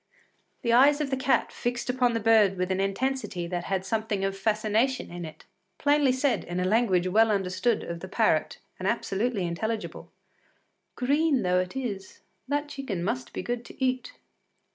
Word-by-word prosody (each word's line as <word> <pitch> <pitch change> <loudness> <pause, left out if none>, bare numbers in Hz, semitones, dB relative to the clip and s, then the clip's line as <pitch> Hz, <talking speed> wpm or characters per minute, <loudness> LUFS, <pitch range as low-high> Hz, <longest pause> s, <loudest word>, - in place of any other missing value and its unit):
The 235 -1 +2
eyes 280 +4 +6
of 290 -2 -2
the - - +2
cat, 265 0 +1
fixed 240 0 -3
upon 250 -1 +2
the 230 - 0
bird 215 -3 +4
with 185 +1 -1
an 190 - 0
intensity 195 -2 -1
that 175 0 -4
had 190 -1 -2
something 215 -1 -1
of 195 0 -2
fascination 215 +5 0
in 175 -1 -6
it, 155 - -11 0.3
plainly 290 -2 +3
said 260 +1 +1
in 175 +1 -4
a 180 - 0
language 190 -3 +2
well 220 +4 +4
understood 200 +3 0
of 170 0 -5
the 185 - -7
parrot 190 -6 +1 0.2
and 185 - -2
absolutely 210 -1 -1
intelligible: 220 +6 -4 0.8
“Green 285 +2 +2
though 180 0 +2
it 185 +4 -3
is, 205 -8 -5 0.3
that 290 +2 -1
chicken 240 -12 -4
must 130 -8 -3
be - - -5
good 240 0 -3
to - - -13
eat. 255 - -2
220 Hz, 175 wpm, -27 LUFS, 185-255 Hz, 0.8 s, eyes